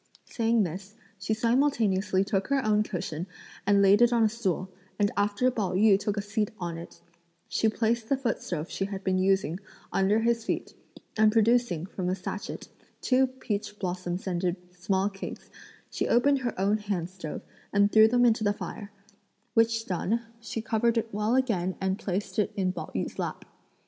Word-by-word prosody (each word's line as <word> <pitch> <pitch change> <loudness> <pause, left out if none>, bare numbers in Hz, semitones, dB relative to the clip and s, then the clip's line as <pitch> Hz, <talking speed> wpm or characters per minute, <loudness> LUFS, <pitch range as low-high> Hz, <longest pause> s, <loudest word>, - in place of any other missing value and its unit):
Saying 230 -2 +1
this, 190 +4 -6 0.2
she 205 +3 -1
simultaneously 225 -6 +2
took 195 -1 -1
her 275 -3 +1
own 210 -1 +3
cushion 180 -4 -4 0.4
and 200 -1 +5
laid 200 +3 +6
it 240 0 +6
on 235 -1 +3
a 220 - +4
stool, 195 -5 -2 0.3
and 205 -1 +2
after 205 +5 +2
Pao 210 -7 -2
yü 200 +1 +5
took 205 0 -2
a 205 - -1
seat 210 0 -1
on 170 -2 -4
it, 170 - -11 0.5
she 220 - +1
placed 225 +1 0
the 275 - +3
footstove 185 - -2
she 195 - -3
had 195 -1 -6
been 185 -1 +1
using, 190 -3 +1 0.3
under 195 +3 +3
his 230 0 +1
feet; - - -3 0.5
and 215 0 +6
producing, 225 -6 +2
from 185 -1 -4
a 185 - 0
satchet, 190 +2 -6 0.3
two 260 0 +3
peach 210 -5 -4
blossom 180 -2 -3
scented 180 -1 -1 0.2
small 190 +2 0
cakes, 195 -1 -8 0.4
she - - -1
opened 275 +3 +3
her 240 -6 -3
own 205 +3 +2
hand 200 -5 -2
stove 180 -4 -7 0.3
and 200 0 +3
threw 220 0 +7
them 245 +2 +3
into 225 -1 +3
the 205 -1 +2
fire; 205 0 -7 0.6
which 225 0 +2
done, 205 +5 -1 0.2
she 225 -1 -5
covered 230 +1 +1
it 225 -1 -2
well 210 +4 +1
again 195 -9 +1
and 190 +1 -1
placed 195 +1 -3
it 210 - +1
in 185 -2 0
Pao - - -6
yü's - - -3
lap. - - -4
205 Hz, 180 wpm, -28 LUFS, 190-230 Hz, 0.6 s, threw